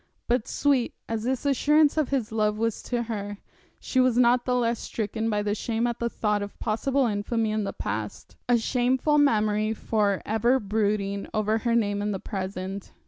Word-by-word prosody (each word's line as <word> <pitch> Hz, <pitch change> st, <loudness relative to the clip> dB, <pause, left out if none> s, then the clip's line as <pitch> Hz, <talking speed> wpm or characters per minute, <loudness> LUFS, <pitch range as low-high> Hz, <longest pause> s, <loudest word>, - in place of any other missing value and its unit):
But 240 Hz, -2 st, +1 dB
sweet 275 Hz, -4 st, +1 dB
as 225 Hz, -1 st, -2 dB
this 255 Hz, +3 st, -2 dB
assurance 290 Hz, +2 st, +4 dB
of 310 Hz, -3 st, +1 dB
his 255 Hz, -6 st, -1 dB
love 215 Hz, -1 st, +1 dB
was 230 Hz, 0 st, -1 dB
to 240 Hz, -1 st, -2 dB
her, 205 Hz, -3 st, -5 dB, 0.4 s
she 260 Hz, -, -1 dB
was 255 Hz, -2 st, +3 dB
not 245 Hz, 0 st, +4 dB
the 250 Hz, -, +1 dB
less 235 Hz, -2 st, +1 dB
stricken 220 Hz, +1 st, -3 dB
by 210 Hz, -1 st, 0 dB
shame 225 Hz, +2 st, -1 dB
at 240 Hz, -1 st, -2 dB
the 235 Hz, -, 0 dB
thought 210 Hz, -2 st, 0 dB
of 205 Hz, 0 st, -7 dB
possible 260 Hz, +5 st, 0 dB
infamy 220 Hz, +1 st, -1 dB
in 215 Hz, -1 st, -1 dB
the -, -, -2 dB
past, -, -, -5 dB
a 245 Hz, -, +5 dB
shameful 255 Hz, +5 st, +2 dB
memory 215 Hz, -5 st, +2 dB
for 205 Hz, -3 st, 0 dB
ever 235 Hz, +5 st, +2 dB
brooding 200 Hz, -1 st, -1 dB
over 215 Hz, +1 st, +1 dB
her 235 Hz, 0 st, 0 dB
name 205 Hz, -3 st, +1 dB
in 205 Hz, 0 st, -1 dB
the 190 Hz, -, -3 dB
present. 190 Hz, -1 st, -5 dB
225 Hz, 185 wpm, -26 LUFS, 210-245 Hz, 0.4 s, a